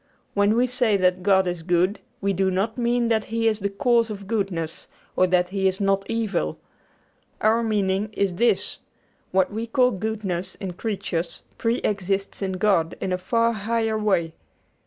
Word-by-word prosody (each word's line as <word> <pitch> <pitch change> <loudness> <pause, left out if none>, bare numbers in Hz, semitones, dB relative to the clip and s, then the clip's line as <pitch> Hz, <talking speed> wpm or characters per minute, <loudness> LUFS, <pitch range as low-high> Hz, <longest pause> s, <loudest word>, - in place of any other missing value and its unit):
When 205 +1 +3
we 245 +2 +4
say 245 -4 +2
that 185 -1 +2
God 190 0 +4
is 175 -1 -3
good, 180 +4 +1 0.2
we 200 0 +1
do 190 +1 +1
not 195 +4 -1
mean 240 -1 +1
that 220 -2 +1
He 225 0 0
is 220 -1 +1
the 200 0 -1
cause 235 +2 +2
of 200 -2 -6
goodness 190 -7 -3 0.3
or 185 - +4
that 180 0 +2
He 190 0 +1
is 190 0 -1
not 195 -1 +1
evil. 215 - -1 0.8
Our 220 +2 +3
meaning 205 -2 0
is 200 -3 0
this: 235 +7 +1 0.5
What 190 +1 +1
we 225 +2 -3
call 250 +2 +3
goodness 195 -3 -3
in 190 -2 -5
creatures 180 -4 -3 0.2
preexists 200 -5 -1
in 190 -1 -1
God 185 -4 +1
in 185 - -2
a - - +1
far 230 +5 +1
higher 225 +1 -1
way. 190 -7 +1
200 Hz, 170 wpm, -24 LUFS, 185-225 Hz, 0.8 s, we